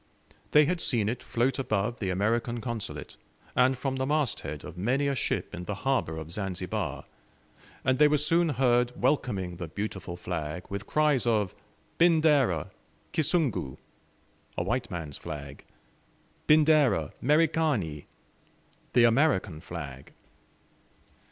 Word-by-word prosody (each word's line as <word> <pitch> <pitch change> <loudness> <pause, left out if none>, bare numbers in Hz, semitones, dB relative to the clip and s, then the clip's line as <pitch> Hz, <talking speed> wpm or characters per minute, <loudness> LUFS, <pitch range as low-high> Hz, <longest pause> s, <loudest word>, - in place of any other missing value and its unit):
They 150 0 +6
had 175 +2 -1
seen 115 -6 +1
it 120 +3 -2
float 125 +4 0
above 110 -2 -1
the 95 - -2
American 115 +5 0
Consulate, 115 -1 -5 0.4
and 130 +1 +4
from 135 +1 -2
the 130 0 -1
mast 150 -4 +1
head 75 -1 -6
of 90 -1 -9
many 125 +10 0
a 140 - +1
ship 135 - -2
in 90 - -6
the 105 - -3
harbor 130 -12 +1
of 80 0 -7
Zanzibar, 90 -5 -3 0.8
and 130 0 +2
they 150 - +7
were 150 0 +3
soon 165 +3 +2
heard 125 -2 +2
welcoming 95 - 0
the 85 -2 -5
beautiful 95 -1 -5
flag 90 -1 -4
with 100 +1 -5
cries 150 -5 +2
of 105 -5 +1 0.5
"Bindera 155 - +3 0.4
Kisungu!" 150 - 0 0.8
a - - 0
white 120 -1 -1
man's 80 -5 -6
flag! 70 -2 -8 0.8
"Bindera 150 - +4
Merikani!" 150 - +1 0.9
the 120 - +5
American 115 - +3
flag! 70 -7 -8
120 Hz, 130 wpm, -28 LUFS, 90-140 Hz, 0.9 s, they